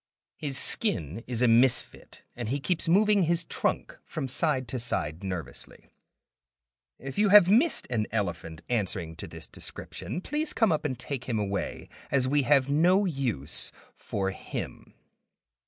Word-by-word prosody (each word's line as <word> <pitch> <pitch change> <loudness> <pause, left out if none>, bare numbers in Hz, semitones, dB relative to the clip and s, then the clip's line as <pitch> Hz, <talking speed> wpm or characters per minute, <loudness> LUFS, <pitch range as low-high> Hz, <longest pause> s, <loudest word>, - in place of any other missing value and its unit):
His 140 -3 -1
skin 110 - +3
is 120 -1 -1
a - - +5
misfit, 120 +2 +2
and 120 -3 -4
he 140 +3 -1
keeps 170 +4 -1
moving 205 +3 +4
his 170 0 +1
trunk - - -2
from 135 - -5
side 130 -1 0
to 130 - -3
side 85 -8 -3
nervously. 85 -10 -6 1.1
If 135 +6 -6
you 210 -1 +4
have 205 -3 +8
missed 245 - +3
an 110 -3 0
elephant 85 -6 -3
answering 95 -8 -2
to - - -7
this - - -7
description, - - -6
please 300 - -2
come 225 -6 +3
up 155 -1 -1
and 130 -4 -2
take 130 0 -5
him 120 -3 -2
away, 100 -2 -3 0.2
as 130 -2 +2
we 145 +2 +2
have 135 0 +3
no 175 +8 +3
use 125 - -1 0.2
for 95 -1 -3
him. - - -7
130 Hz, 155 wpm, -28 LUFS, 105-170 Hz, 1.1 s, have